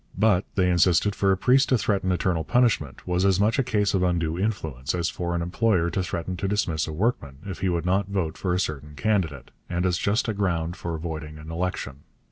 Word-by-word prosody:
But, 105 -4 +3
they 95 -2 +3
insisted, 90 +3 +3
for 100 -1 +2
a 95 - +2
priest 130 +6 +3
to 130 - +4
threaten 100 -4 0
eternal 90 -2 0
punishment 115 - +1
was 90 +1 +1
as 95 -1 +3
much 110 +6 +2
a - - +3
case 105 -5 +1
of 95 - +2
undue 85 -3 0
influence 80 - -2
as 85 -1 0
for 85 -1 -3
an 85 - -1
employer 90 -1 +1
to 95 - -1
threaten 90 0 -3
to 95 - -2
dismiss 90 -6 0
a - - -4
workman 75 - -1
if 95 -3 -6
he 95 -1 0
would 85 -2 -1
not 95 +2 +1
vote 90 -5 -1
for 90 - -2
a 90 - +1
certain 75 -4 -4
candidate, 80 - -1 0.2
and 90 +1 -1
as 90 -1 +1
just 105 +4 +1
a 110 - 0
ground 85 -4 -1
for 85 -1 -4
voiding 80 -2 -6
an 75 +1 -9
election. 85 -5 -3
90 Hz, 225 wpm, -25 LUFS, 80-100 Hz, 0.2 s, to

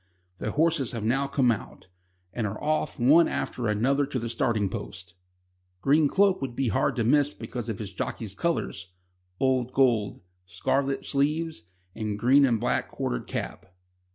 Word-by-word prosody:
The - - -2
horses 160 -4 +1
have 115 -3 -4
now 135 +5 +1
come 135 -3 +2
out, 105 - -6 0.5
and 115 -3 -1
are 105 +2 -5
off 155 -1 -1
one 150 +8 +6
after 120 -2 -2
another 135 +7 +1
to 135 - -3
the 115 -1 -3
starting 115 -3 0
post. 90 -1 -7 0.7
Green 145 +7 +4
Cloak 195 +3 +3
would 130 -3 -4
be 135 -2 0
hard - - +1
to 115 - 0
miss 145 +5 +3
because 120 -2 -6
of 110 - -3
his 100 -3 -7
jockey's 100 +2 -4
colours 95 - -2 0.5
old 130 -1 +1
gold, 120 -6 +2 0.3
scarlet 135 +9 -1
sleeves, 150 - -1 0.3
and 105 -1 -3
green 135 +5 +5
and 115 -3 +1
black 120 - 0
quartered - - -3
cap. 90 -1 -6
125 Hz, 160 wpm, -27 LUFS, 110-140 Hz, 0.7 s, one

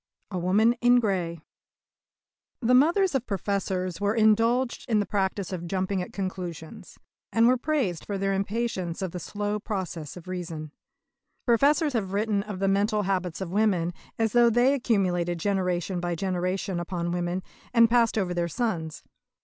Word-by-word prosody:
A 185 - -2
WOMAN 205 +7 +3
IN 245 0 +6
GREY 180 -7 -1 1.2
The 245 0 +2
mothers 340 +8 +4
of 260 -3 -1
Professors 190 -2 -2
were 205 +1 +1
indulged 230 +4 +2
in 220 -2 +3
the 205 - +1
practice 195 -2 -1
of 175 -1 -4
jumping 190 +1 -1
at 180 - -6
conclusions, 180 -4 -6 0.3
and 230 +1 +4
were 255 - +5
praised 250 - -1
for 200 - -2
their 195 0 0
impatience 195 -3 -2
of 185 - -3
the 180 - -5
slow 205 +4 -3
process 185 - -5
of 180 - -12
reason. 165 -4 -5 0.7
Professors 285 +5 +3
have 195 -5 -2
written 205 0 +1
of 205 -1 -6
the 195 +1 0
mental 205 +2 +2
habits 185 -2 -2
of 180 -3 -4
women 185 -4 +1 0.2
as 225 -1 +1
though 240 -1 +5
they 240 +4 +4
accumulated 185 -9 +1
generation 180 -1 -1
by 175 0 -2
generation 185 +1 -2
upon 175 0 -3
women, 175 +1 -2 0.3
and 230 -1 +6
passed 230 -1 +3
over 185 -4 0
their 175 -1 0
sons. 165 -6 -3
195 Hz, 160 wpm, -26 LUFS, 180-225 Hz, 1.2 s, IN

